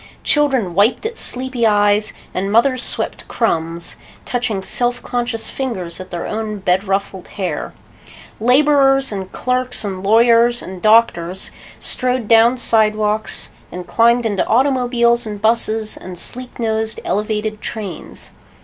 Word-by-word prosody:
Children 265 - +1
wiped 205 - +2
at 450 +1 -3
sleepy 255 - 0
eyes 205 0 +3 0.2
and 195 +2 -2
mothers 255 +3 +3
swept - - -3
crumbs, 165 -6 -2 0.3
touching 235 -6 -2
self 245 +4 +1
conscious 240 -2 -3
fingers 190 -11 -4
at 185 - -9
their 175 - -5
own 215 -1 -4
bed 185 0 0
ruffled 195 -1 -3
hair. 180 -7 -5 0.6
Laborers 270 +2 +3
and 190 -2 -5
clerks 255 -1 -1
and 190 -2 -5
lawyers 235 +3 +4
and 185 -1 -9
doctors 190 -5 +2 0.3
strode 250 -3 -1
down 230 +2 +5
sidewalks 215 -2 +2 0.2
and 180 0 -7
climbed 235 +3 +3
into 205 -3 0
automobiles 240 -2 +2
and 210 -1 -6
busses 220 0 +1
and 180 -1 -9
sleek 250 +7 -1
nosed 220 -1 -1
elevated 215 0 -2
trains. 205 -5 -7
220 Hz, 130 wpm, -18 LUFS, 200-245 Hz, 0.6 s, down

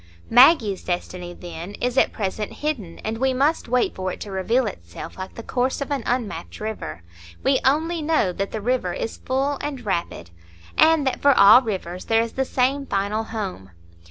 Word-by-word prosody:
Maggie's 245 - +6
destiny, 180 0 -4
then, 175 +2 -8
is 245 +3 -2
at - - +3
present 210 +1 -3
hidden, 245 - -4
and 220 +1 -3
we 265 0 +2
must 290 +4 +1
wait 250 0 +2
for 185 0 -3
it - - -8
to 205 - -6
reveal 225 +7 +1
itself 85 - -7
like 185 0 -8
the 230 - -8
course 255 +2 -1
of 280 +1 -4
an 280 -3 0
unmapped 240 -3 -3
river; 205 - -5 0.4
we 270 -1 +3
only 320 +5 +1
know 305 - +2
that 195 +2 -3
the 220 - -4
river 235 -6 0
is 225 - -4
full 270 +2 -1
and 275 -5 -5
rapid, 170 - -3 0.4
and 315 -2 +5
that 265 - -1
for 280 -2 +5
all 205 +5 +9
rivers 185 -6 -5
there 225 0 +3
is 230 - -5
the 265 - 0
same 270 +2 0
final 205 +3 -1
home. 195 - -5
225 Hz, 185 wpm, -23 LUFS, 190-265 Hz, 0.4 s, all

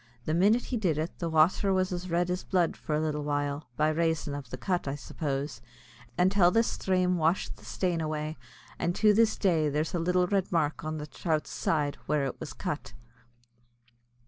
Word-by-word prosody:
The 155 - 0
minit 205 +8 +4
he 250 - -2
did, 180 -9 +1 0.2
the 170 - -2
wather 165 +5 +3
was 185 -1 +1
as 180 0 -4
red 175 +1 +1
as 180 +1 -2
blood 180 -3 +1
for 150 - -3
a - - +1
little 155 -1 -1
while, 145 0 -2
by 155 +1 +3
rayson 160 -2 0
av 140 -4 -6
the 125 - -6
cut, 175 +4 -1
I 135 - -1
suppose, 140 -3 -4 0.6
until 185 0 +5
the 225 +5 +3
sthrame 185 -4 +1
washed 165 +3 0
the - - -16
stain 175 -3 -1
away; 155 0 -3 0.4
and 175 +1 0
to 210 -1 +5
this 220 +1 +3
day 165 -6 +2
there's 150 +5 -1
a 175 - 0
little 180 +2 +2
red 195 0 0
mark 155 -4 0
an 155 0 -3
the 150 - -5
throut's 155 0 -2
side, 145 -3 0
where 150 -2 +1
it 135 - -4
was - - -6
cut. - - -5
165 Hz, 195 wpm, -29 LUFS, 150-185 Hz, 0.6 s, until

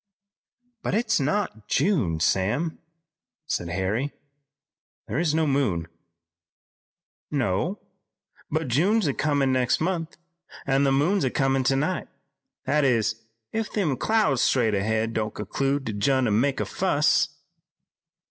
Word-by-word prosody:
"But - - -1
it's 225 -3 +1
not 140 - -1
June, 105 - +1
Sam," 105 - 0 0.7
said 85 - -2
Harry, 95 +8 -1
"and 145 - -5 1.0
there 140 - -2
is 160 -3 +1
no 160 0 +2
moon." 130 - 0 1.4
"No, 140 - 0 0.7
but 160 -1 -1
June's 185 - +2
comin' 145 -3 +2
next 125 -1 +2
month, 165 -1 -2 0.5
an' 135 +1 +2
the 135 - +3
moon's 145 +3 +2
comin' 135 -1 +2
tonight; 140 +7 0 0.6
that 150 0 +2
is, 115 -4 +1 0.3
if 225 -1 -2
them 175 -10 0
clouds 150 - +2
straight 115 -5 +2
ahead 110 +3 0
don't 110 -1 -2
conclude 135 +7 -1
to 110 - -3
j'in 130 +6 +2
an' 110 0 +2
make 140 0 0
a - - 0
fuss." 150 -4 +1
135 Hz, 125 wpm, -25 LUFS, 110-160 Hz, 1.4 s, the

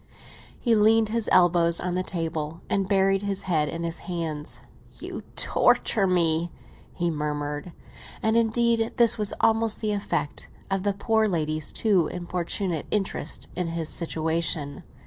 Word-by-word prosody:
He 235 - +2
leaned 220 0 +4
his 230 0 0
elbows 170 -2 +4
on 180 -1 -2
the 180 - 0
table 165 -3 -4
and 195 -1 0
buried 195 -1 +3
his 200 -1 -2
head 155 -5 +1
in 165 +2 -4
his 170 0 -3
hands. 165 -4 -5 0.3
"You - - -7
torture 200 -4 +2
me!" 170 -2 +2 0.4
he 175 -1 -1
murmured. 150 +1 -3 0.5
And, 220 0 +2
indeed, 230 0 +2
this 235 -1 +4
was 210 -1 +2
almost 225 -1 +2
the 215 -1 -1
effect 195 -7 -2 0.2
of 195 0 +1
the 200 +1 0
poor 220 +2 +1
lady's 155 -4 -1
too 195 -8 +2
importunate 175 -1 -2
interest 200 -2 -2
in 180 -1 -2
his 165 -1 -3
situation. 160 -3 -1
180 Hz, 145 wpm, -25 LUFS, 165-210 Hz, 0.5 s, leaned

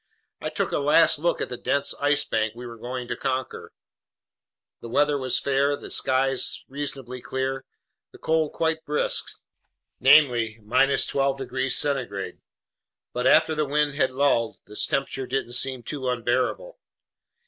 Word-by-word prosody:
I - - -2
took - - -2
a - - 0
last - - +5
look - - 0
at - - -2
the - - -5
dense 140 0 0
Ice 145 0 +3
Bank 110 -1 -1
we 125 +1 -9
were 115 -1 -9
going 125 +1 -5
to - - -3
conquer. 130 -1 -4 1.1
The 115 - -9
weather 145 +4 +2
was 130 -3 0
fair, 140 +1 +1
the - - -9
skies 130 0 +1
reasonably 135 -3 -6
clear, 130 +1 -3 0.5
the - - -14
cold 160 -1 0
quite 160 -1 -1
brisk, 150 -1 -1 0.7
namely 120 -5 +4
12 135 +2 +2
degrees 130 0 -1
centigrade; 125 -9 -2 0.7
but 125 +1 0
after 160 - +5
the 155 0 0
wind 145 0 +1
had 135 -3 +1
lulled, 130 -4 +1
this 105 0 -1
temperature 135 -1 -2
didn't 130 -2 -2
seem 130 0 0
too 130 +1 -4
unbearable. 125 - -1
135 Hz, 150 wpm, -25 LUFS, 125-145 Hz, 1.1 s, last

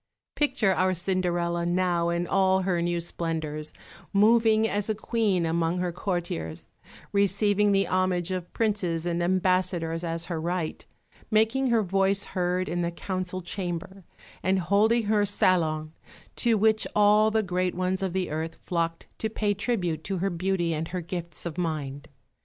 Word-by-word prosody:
Picture 265 -9 +2
our 185 0 +1
Cinderella 175 -1 0
now 175 -1 +1
in 170 0 0
all 190 0 +2
her 180 -2 0
new 175 0 0
splendours, 160 -3 -3 0.4
moving 220 +1 +4
as 205 0 -2
a 215 - +1
Queen 210 -5 0
among 165 +1 0
her 180 -1 -1
courtiers, 165 - -4 0.4
receiving 205 +1 +2
the 195 0 +3
homage 185 -1 0
of 180 -2 -4
princes 185 -7 0
and 170 0 -1
ambassadors 180 -2 +1
as 165 0 -2
her 170 -3 -3
right, 170 -1 -3 0.4
making 225 +5 +2
her 230 -3 +3
voice 195 +1 +1
heard 180 0 -1
in 175 0 -1
the 170 - 0
Council 185 +1 -4
Chamber, 190 +1 -5 0.4
and 190 +1 +2
holding 215 +6 +3
her 210 0 +2
salon, 160 -6 +1 0.4
to 235 -2 +2
which 220 +1 +3
all 210 +1 +5
the 220 0 +1
great 180 -1 -1
ones 185 +1 -1
of 190 -2 -1
the 185 -4 -1
earth 160 +1 -3
flocked 165 -1 -2
to 220 - -1
pay 210 -1 0
tribute 185 -7 -2
to 195 -1 -2
her 195 +2 -1
beauty 175 -1 0
and 160 +1 -3
her 180 +1 -4
gifts 170 -1 -5
of 170 0 -4
mind. 150 -4 -3
185 Hz, 160 wpm, -27 LUFS, 170-200 Hz, 0.4 s, all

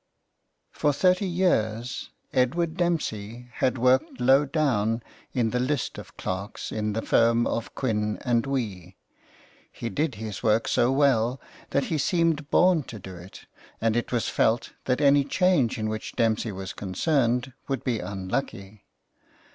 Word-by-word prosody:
For 145 - +1
thirty 185 +6 +2
years 125 - 0 0.2
Edward 160 +6 +1
Dempsey 125 - -2
had 130 0 +1
worked 130 +1 +2
low 135 +4 +5
down 120 -7 0 0.3
in 120 -4 0
the 125 - 0
list 130 +2 -1
of - - -13
clerks 95 +4 -4
in 105 -1 -2
the 110 - -2
firm 115 0 +3
of 115 - -3
Quin 105 -5 -1
and 120 -1 +1
Wee. 100 -10 -4 0.7
He 115 - -5
did 150 -3 -1
his 105 -2 -6
work 110 0 +2
so 120 - +3
well 130 -3 +2 0.3
that 140 - +1
he 155 - 0
seemed 165 -2 +1
born 180 -3 +4
to 115 - -8
do 95 -2 -9
it, 90 +2 -12 0.3
and 115 -1 +1
it 120 - -1
was 120 -3 0
felt 115 +3 +1
that 130 +2 +1
any 140 0 +5
change 145 - +2
in 110 -1 -2
which 110 0 -5
Dempsey 110 -1 +1
was 95 -1 -6
concerned 125 - 0
would 135 -3 -2
be 120 -4 0
unlucky. 100 +1 -4
120 Hz, 150 wpm, -26 LUFS, 110-140 Hz, 0.7 s, low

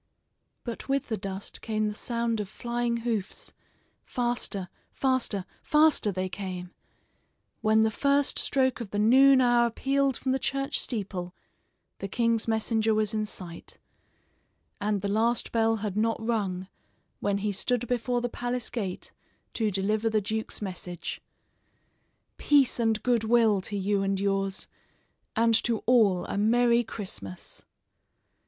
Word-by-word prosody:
But 235 +2 -6
with 275 -1 0
the 220 - 0
dust 195 -1 -6
came 215 -1 -1
the 210 - -2
sound 235 0 -1
of 205 -2 -4
flying 235 +1 -2
hoofs. 220 -5 -2 0.5
Faster, 240 -6 -2 0.2
faster, 255 -8 0 0.2
faster, 300 -8 +4
they 185 0 -2
came. 185 -2 -6 0.9
When 220 0 +4
the 220 - +2
first 280 +4 +1
stroke 260 -2 +1
of 225 - -6
the 205 - -4
noon 260 +5 +6
hour 240 -1 +4
pealed 275 +3 +1
from 260 - -1
the 265 - +1
church 275 +2 -1
steeple 190 -6 -4 0.6
the 195 - -4
king's 230 +2 +1
messenger 220 0 +1
was 215 0 +1
in 215 -1 -1
sight, 175 -5 -9 1.0
and 205 -1 0
the - - 0
last 225 +4 +1
bell 225 -1 +2
had 200 -2 -3
not 225 +2 +1
rung 200 -5 -2 0.5
when 200 0 0
he 205 +1 -1
stood 245 +4 -1
before 245 0 0
the 245 - 0
palace 245 0 -3
gate 195 -7 -4 0.4
to 220 -2 0
deliver 210 +3 0
the 215 -1 +2
duke's 220 +1 -3
message: 180 -2 -5 1.2
"Peace 280 -4 +3
and 225 -2 +1
good 240 -3 +2
will 220 -3 +4
to 205 +2 -4
you 200 +1 +1
and 195 0 0
yours; 195 0 -1 0.7
And 230 +1 +3
to 230 -2 -1
all 215 -7 +4
a - - -3
Merry 235 +2 +4
Christmas." 185 - -6
220 Hz, 140 wpm, -28 LUFS, 200-240 Hz, 1.2 s, noon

